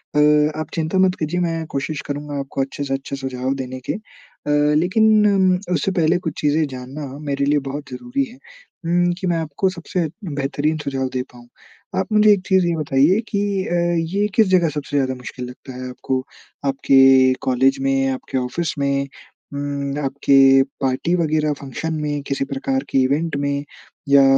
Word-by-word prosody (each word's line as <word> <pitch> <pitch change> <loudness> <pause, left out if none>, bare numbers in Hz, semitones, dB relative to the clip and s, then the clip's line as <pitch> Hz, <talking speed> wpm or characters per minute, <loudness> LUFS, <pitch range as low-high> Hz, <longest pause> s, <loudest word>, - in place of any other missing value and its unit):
अ, 150 +1 +4
आप 155 - -3
चिंता 160 +3 -1
मत 185 -1 +3
कीजिए 160 +3 -1
मैं 165 -2 -1
कोशिश 140 +2 -3
करूँगा 145 0 -4
आपको 135 0 -3
अच्छे 135 +1 -3
से 135 -1 -2
अच्छे 135 +1 -4
सुझाव 130 -1 -3
देने 130 -1 -5
के। - - +2
अ, 200 -7 -9 0.2
लेकिन 195 +1 +4
उससे 180 +3 +1
पहले 170 -1 +2
कुछ 160 - -5
चीज़ें 150 +1 +2
जानना 130 +3 -7
मेरे 140 -2 -1
लिए 145 +1 +3
बहुत 140 +1 -6
ज़रूरी 245 - -2
है 255 - -15 0.5
उम, 175 +1 +2
कि 190 - -2
मैं 170 -1 +1
आपको 160 +4 -1
सबसे 175 -1 -3 0.2
बेहतरीन 145 0 -1
सुझाव 135 -3 -2
दे 130 - 0
पाऊँ। 120 0 -15 0.5
आप 190 - -1
मुझे 210 0 +6
एक 200 -2 +3
चीज़ 190 -2 +4
ये 170 - +1
बताइये 150 +6 +3
कि 200 - -1 0.3
अ, 175 - -1 0.4
ये 205 +1 +2
किस 220 -3 +5
जगह 180 -3 +3
सबसे 145 -1 -3
ज़्यादा 130 -1 0
मुश्किल 125 0 -7
लगता 130 +1 -11
है 130 0 -6
आपको? 130 +1 -2 0.5
आपके 135 -1 +5
कॉलेज 130 +1 +2
में, 135 0 +1
आपके 130 0 -3
ऑफ़िस 130 +7 -2
में, 140 0 0 0.5
उम, 140 0 -3
आपके 140 0 +2 0.4
पार्टी 135 +7 +1
वग़ैरह 155 -3 +1
फ़ंक्शन 150 +4 -4
में, 145 -1 -2
किसी 135 0 -1
प्रकार 270 - -2
के - - 0
इवेंट 145 +4 0
में 140 0 -1 0.5
या 140 -1 +7
145 Hz, 175 wpm, -20 LUFS, 135-170 Hz, 0.5 s, या